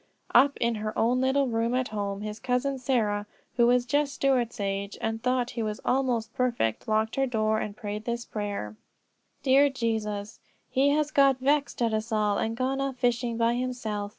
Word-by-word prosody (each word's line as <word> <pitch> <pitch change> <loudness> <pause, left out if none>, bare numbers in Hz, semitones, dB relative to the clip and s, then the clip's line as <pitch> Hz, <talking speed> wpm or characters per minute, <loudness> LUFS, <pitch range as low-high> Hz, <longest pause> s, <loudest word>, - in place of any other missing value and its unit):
'" - - -45
Up 275 +4 +5
in 235 0 +1
her 215 0 -4
own 245 +3 +2
little 265 +2 +2
room 230 +1 0
at 255 0 0
home, 200 -1 -3
his 210 +1 -5
Cousin 260 +2 -1
Sarah, 215 -6 0 0.3
who 235 -1 +5
was 245 0 +3
just 285 +3 0
Stuart's 250 -4 +1
age, 200 0 -3
and 225 0 -2
thought 250 0 0
he 240 -2 -4
was 215 -1 -3
almost 245 -4 0
perfect, 235 - -1
locked 220 +2 0
her 270 0 +2
door 220 -2 +1
and 210 -1 -5
prayed 210 +1 -5
this 235 0 -3
prayer: 205 - -4 0.7
"Dear 275 +1 +5
Jesus: 215 -5 -3 0.3
He 275 +2 +3
has 300 +1 +1
got 275 -2 +4
vexed 280 -1 +1
at 230 -1 +1
us 220 +2 -2
all 210 -2 +1
and 225 +1 -2
gone 265 +2 0
off 275 -1 -2
fishing, 240 -1 0
by 230 0 +2
himself. 240 -5 -3
235 Hz, 190 wpm, -27 LUFS, 215-260 Hz, 0.7 s, Up